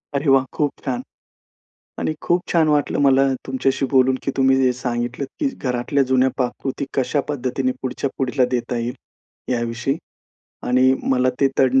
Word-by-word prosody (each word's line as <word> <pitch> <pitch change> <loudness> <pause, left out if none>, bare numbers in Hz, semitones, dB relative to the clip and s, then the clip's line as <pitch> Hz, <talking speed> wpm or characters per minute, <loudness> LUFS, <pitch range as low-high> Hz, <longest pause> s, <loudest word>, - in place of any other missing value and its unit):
अरे 140 +1 +1
वाह! 135 -1 +5
खूप 145 -2 0
छान. 245 - -2 1.0
आणि - - -1
खूप 175 +1 +2
छान 165 -2 +4
वाटलं 150 -1 +1
मला 135 -1 +5 0.2
तुमच्याशी 135 +1 0
बोलून, 130 -1 +4
की - - -1
तुम्ही 135 0 +4
जे 125 - +4
सांगितलत 120 +1 -3
की 290 - +2
घरातल्या 125 +2 0
जुन्या 130 0 +4
पाककृती 130 +2 -2
कशा 135 +2 +1
पद्धतीने 130 -2 -1
पुढच्या 130 +1 -2
पुढीला 130 0 +1
देता 125 0 -1
येईल, 120 +1 -3 0.6
याविषयी. 120 +3 -1 0.7
आणि 130 +1 +4 0.2
मला 130 0 +3
ते 135 - +5
तड 135 0 +4
130 Hz, 155 wpm, -21 LUFS, 125-140 Hz, 1.0 s, वाह